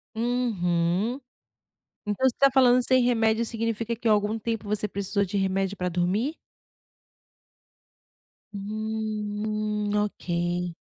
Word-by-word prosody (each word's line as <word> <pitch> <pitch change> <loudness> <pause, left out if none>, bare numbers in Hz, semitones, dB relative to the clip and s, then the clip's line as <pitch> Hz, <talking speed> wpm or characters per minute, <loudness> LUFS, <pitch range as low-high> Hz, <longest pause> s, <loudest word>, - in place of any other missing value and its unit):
Uhum. 220 -2 0 0.9
Então, 235 +6 +2
você 240 - -3
está 275 0 +5
falando 255 -1 +5
"sem 255 -1 +4
remédio", 225 -1 +2
significa 230 0 -2
que 235 - -9
há 220 - +6
algum 210 +2 +1
tempo 225 -1 -3
você 210 0 0
precisou 200 0 -1
de 195 +2 -4
remédio 195 +1 0
para 180 0 -1
dormir? 190 - 0 2.2
Hum, 200 0 -6 1.2
hum. 205 - 0
Ok. 175 -4 -1
210 Hz, 115 wpm, -26 LUFS, 190-235 Hz, 2.2 s, há